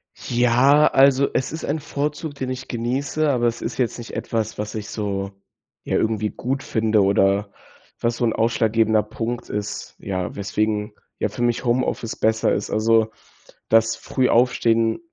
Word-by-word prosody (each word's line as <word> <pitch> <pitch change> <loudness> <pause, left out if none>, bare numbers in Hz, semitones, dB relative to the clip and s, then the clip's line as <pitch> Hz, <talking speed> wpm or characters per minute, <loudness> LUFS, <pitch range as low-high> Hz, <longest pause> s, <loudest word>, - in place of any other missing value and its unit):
Ja, 125 +5 +4
also, 135 0 +4
es 130 - -1
ist 160 - -6
ein 150 +2 -1
Vorzug, 150 +1 -4
den 130 -2 -4
ich 130 0 -5
genieße, 135 +6 -1
aber 120 -3 +2
es 115 0 -2
ist 115 - -4
jetzt 125 -3 0
nicht 120 -1 -9
etwas, 110 -1 -2
was 105 +1 -4
ich 105 -1 -5
so, 100 -2 -3 0.5
ja, - - -2
irgendwie 110 -1 0
gut 135 +2 -3
finde 110 -2 +1
oder 100 +1 +2 0.5
was 115 0 0
so 120 - +1
'n 115 - +1
ausschlaggebender 110 -1 +2
Punkt 115 +2 -5
ist, 105 0 -5
ja, 95 -3 -4
weswegen, 105 +1 -1 0.3
ja, - - 0
für - - -7
mich 120 +1 0
Homeoffice 120 -2 0
besser 110 0 +2
ist. - - -2
Also, 110 0 +3 0.6
das 115 0 +4
Frühaufstehen 115 -2 +2
115 Hz, 160 wpm, -22 LUFS, 110-125 Hz, 0.6 s, Ja